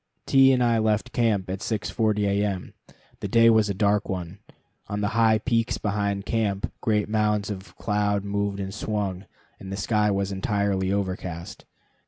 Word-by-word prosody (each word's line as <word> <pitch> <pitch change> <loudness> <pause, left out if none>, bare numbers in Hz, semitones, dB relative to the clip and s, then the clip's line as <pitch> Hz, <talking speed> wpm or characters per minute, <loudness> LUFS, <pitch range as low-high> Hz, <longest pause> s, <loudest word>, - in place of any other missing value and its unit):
T 135 -1 +6
and 125 -1 +3
I 115 -1 +3
left 110 +2 0
camp 110 -6 +1
at 95 - -3
6.40 110 -1 0
A. 100 +1 +1
M. 95 -3 -3 0.5
The - - -3
day 115 0 +5
was 110 -2 +3
a 100 - -1
dark 105 +1 +1
one. 90 0 -5 0.5
On 105 0 -3
the 105 - 0
high 110 -1 +3
peaks 115 0 0
behind 100 -1 -1
camp 105 -4 -1
great 105 -3 +1
mounds 105 -1 0
of 95 -1 -9
cloud 105 -2 0
moved 100 0 -2
and 95 0 -4
swung, 105 -2 -3 0.3
and 95 - -8
the 95 - -4
sky 105 0 +1
was 100 0 0
entirely 100 -1 0
overcast. 95 -4 -4
105 Hz, 170 wpm, -25 LUFS, 100-110 Hz, 0.5 s, T